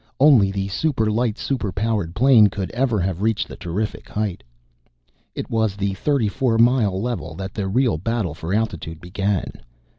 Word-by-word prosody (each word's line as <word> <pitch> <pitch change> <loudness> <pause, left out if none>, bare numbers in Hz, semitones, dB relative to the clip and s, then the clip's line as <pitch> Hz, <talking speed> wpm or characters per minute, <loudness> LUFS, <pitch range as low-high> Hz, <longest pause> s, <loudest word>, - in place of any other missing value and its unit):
Only 130 -9 +6
the 95 0 -2
super 110 0 0
light, 115 0 0
super 120 -8 -2
powered 100 -3 -1
plane 120 -2 +6
could 95 -1 -4
ever 120 -3 0
have 95 0 -2
reached 110 0 0
the - - -9
terrific 100 +4 -4
height. 105 -4 -2 0.9
It - - -4
was 110 -3 +1
at - - -16
the 100 0 0
thirty 130 +3 0
four 120 +1 0
mile 115 -5 +3
level 95 -9 -4
that 95 +2 -6
the 100 -3 -3
real 115 -3 +1
battle 110 -3 -1
for 80 +2 -6
altitude 85 -7 -2
began. 95 +2 -2
105 Hz, 175 wpm, -22 LUFS, 95-115 Hz, 0.9 s, Only